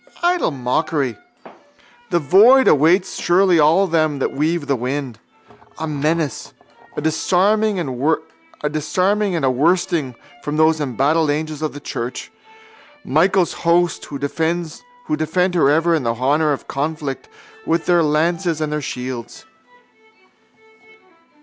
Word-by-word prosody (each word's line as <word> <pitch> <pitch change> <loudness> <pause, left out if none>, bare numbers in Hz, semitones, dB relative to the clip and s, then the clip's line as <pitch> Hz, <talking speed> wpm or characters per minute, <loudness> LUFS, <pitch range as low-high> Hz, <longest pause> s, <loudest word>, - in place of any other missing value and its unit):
Idle 355 0 +2
mockery. 135 -1 -1 0.9
The 175 - +1
void 210 - +5
awaits 170 +6 +3
surely 180 -1 +3
all 160 +6 +4
them 155 -4 0
that 135 - -1
weave 155 +2 -1
the 140 - 0
wind: 125 -1 -4 0.6
a 160 - -4
menace, 155 0 -2 0.4
a - - -2
disarming 195 +7 +1
and 175 - -2
a 160 - -1
worsting 155 -1 0 0.3
from 150 +2 -4
those 155 0 +3
embattled 145 +4 +1
angels 155 0 -3
of 155 - -2
the 145 - -8
church, 125 -3 -6 0.7
Michael's 180 +4 +2
host, 170 +1 +1
who 140 - -7
defend 160 +4 -2 0.8
her 165 -6 +3
ever 165 +3 +2
in 160 - +1
the 115 -2 -1
hour 145 +5 +1
of 140 - -4
conflict 145 -1 -4 0.4
with 165 0 0
their 175 -1 +3
lances 165 +2 0
and 155 -1 -2
their 150 - -2
shields. 125 - -6
155 Hz, 120 wpm, -19 LUFS, 145-175 Hz, 0.9 s, void